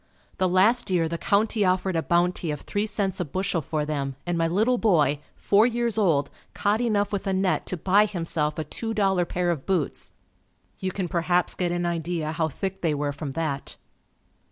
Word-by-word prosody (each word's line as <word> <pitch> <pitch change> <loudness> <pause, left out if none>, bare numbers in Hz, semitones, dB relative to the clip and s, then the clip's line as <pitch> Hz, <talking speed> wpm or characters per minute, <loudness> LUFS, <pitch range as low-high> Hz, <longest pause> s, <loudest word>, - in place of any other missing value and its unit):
The 185 -1 +2
last 200 +6 +3
year 175 -3 +2
the 170 +1 -4
county 210 +1 +2
offered 185 0 +1
a 165 - +2
bounty 175 0 +1
of 150 -1 -3
three 205 +1 -2
cents 200 -2 0
a 180 - -1
bushel 185 +2 -1
for 150 +1 -2
them 140 -3 -3
and 175 0 -1
my 165 0 +1
little 220 +8 +2
boy, 155 -9 +3 0.2
four 210 +3 +4
years 235 -2 -1
old, 160 -10 +2 0.2
caught 210 +3 +1
enough 210 -3 +1
with 200 0 -2
a 195 - +1
net 190 0 0
to 185 - -3
buy 200 +5 +4
himself 165 -5 -1
a 155 - -1
two 225 +9 -4
dollar 195 -4 +2
pair 175 0 0
of 150 -6 -5
boots. 180 -7 -1 0.7
You 190 - -2
can 185 -1 -3
perhaps 175 0 +1
get 175 -2 -1
an 175 0 -1
idea 165 -2 -2
how 160 0 0
thick 190 +5 -5
they 160 -3 +1
were 145 0 -2
from 140 -1 -6
that. 150 -3 -3
180 Hz, 200 wpm, -25 LUFS, 160-200 Hz, 0.7 s, four